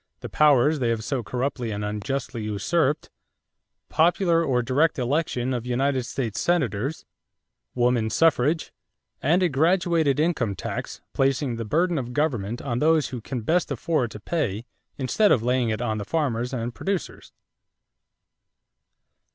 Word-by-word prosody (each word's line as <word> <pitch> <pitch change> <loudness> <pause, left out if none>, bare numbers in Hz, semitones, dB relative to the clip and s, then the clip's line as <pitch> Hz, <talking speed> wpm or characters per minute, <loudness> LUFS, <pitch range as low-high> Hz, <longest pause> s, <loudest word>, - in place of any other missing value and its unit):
the - - -6
powers 150 0 +4
they 120 -3 +1
have 115 -1 -1
so 125 +3 -2
corruptly 125 +2 -3
and 105 -1 -3
unjustly 110 +3 -3
usurped"; 130 - 0 0.8
popular 170 +1 +3
or 125 -5 +1
direct 140 +7 +2
election 130 -1 -1
of 120 -2 -2
United 130 +2 0
States 115 -7 -3
Senators; 140 - 0 0.7
woman 120 -2 +2
suffrage; 155 +3 +2 0.5
and 170 +7 +3
a - - +4
graduated 165 -1 +2
income 145 - 0
tax, - - -5
"placing 135 -2 +1
the 115 0 -4
burden 170 - +1
of 125 -1 -6
government 120 -7 -1
on 120 -3 -2
those 155 0 +3
who 125 -3 -6
can 125 +2 -4
best 170 +10 +1
afford 150 -8 0
to 105 - -9
pay 115 - -2 0.3
instead 175 +11 +2
of 115 - +3
laying 125 -1 +1
it 110 +2 -2
on 110 -2 -1
the - - -3
farmers 125 -3 -1
and 120 -2 -3
producers." 195 +3 -4
130 Hz, 145 wpm, -25 LUFS, 115-160 Hz, 0.8 s, powers